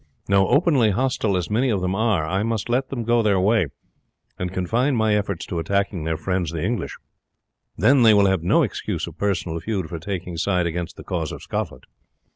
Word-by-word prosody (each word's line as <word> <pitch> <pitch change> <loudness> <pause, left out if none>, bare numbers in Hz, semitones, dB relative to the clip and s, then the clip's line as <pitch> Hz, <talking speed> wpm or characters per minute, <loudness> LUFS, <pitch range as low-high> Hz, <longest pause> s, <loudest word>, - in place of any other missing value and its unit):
No; 100 -1 +4
openly 145 -7 +3
hostile 110 -2 0
as 90 +2 -3
many 125 +5 +2
of 100 -5 0
them 90 +1 -1
are, 105 -6 +1
I 95 +5 -1
must 115 0 -2
let 130 +2 0
them 125 -4 -3
go 120 +1 +3
their 100 -3 +2
way, 100 -2 +3 0.7
and 90 -1 -2
confine 115 +10 0
my 110 -2 +2
efforts 100 -4 -2
to 85 - -3
attacking 95 0 -1
their 80 -1 -1
friends 90 0 -1
the 80 -1 -4
English. 115 +4 -2 0.8
Then 140 -1 +4
they 110 -2 +7
will 100 -1 +5
have 95 -3 +2
no 85 - +3
excuse - - -3
of - - -11
personal 90 -5 -1
feud 95 -5 -3
for 85 - -5
taking 90 -1 -5
side 90 0 +1
against 85 +1 -3
the - - -9
cause 85 -5 -3
of - - -8
Scotland. 65 - -4
100 Hz, 205 wpm, -23 LUFS, 90-115 Hz, 0.8 s, they